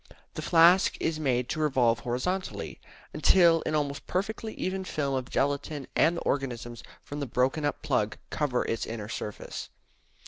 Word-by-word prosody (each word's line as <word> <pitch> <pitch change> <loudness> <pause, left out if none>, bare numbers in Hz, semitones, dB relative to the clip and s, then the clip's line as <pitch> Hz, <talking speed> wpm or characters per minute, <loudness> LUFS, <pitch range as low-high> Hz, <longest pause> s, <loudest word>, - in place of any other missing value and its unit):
The - - -5
flask 175 +3 +5
is 160 -1 -1
made 125 -4 +1
to 155 - -2
revolve 125 -7 +3
horizontally 130 - -3 0.3
until 170 -3 +5
an 155 - 0
almost 140 -2 -2
perfectly 215 +4 -2
even 190 +1 -2
film 145 -6 -2
of 130 -2 -2
gelatine 140 +1 -1
and 170 +2 +4
the - - -4
organisms 120 -4 -2 0.2
from 145 - -6
the 140 - -3
broken 130 +5 +1
up 145 - -2
plug 110 -6 0
cover 135 -5 0
its 115 - -2
inner 110 -2 -5
surface. 105 -2 -6
140 Hz, 160 wpm, -28 LUFS, 125-165 Hz, 0.3 s, flask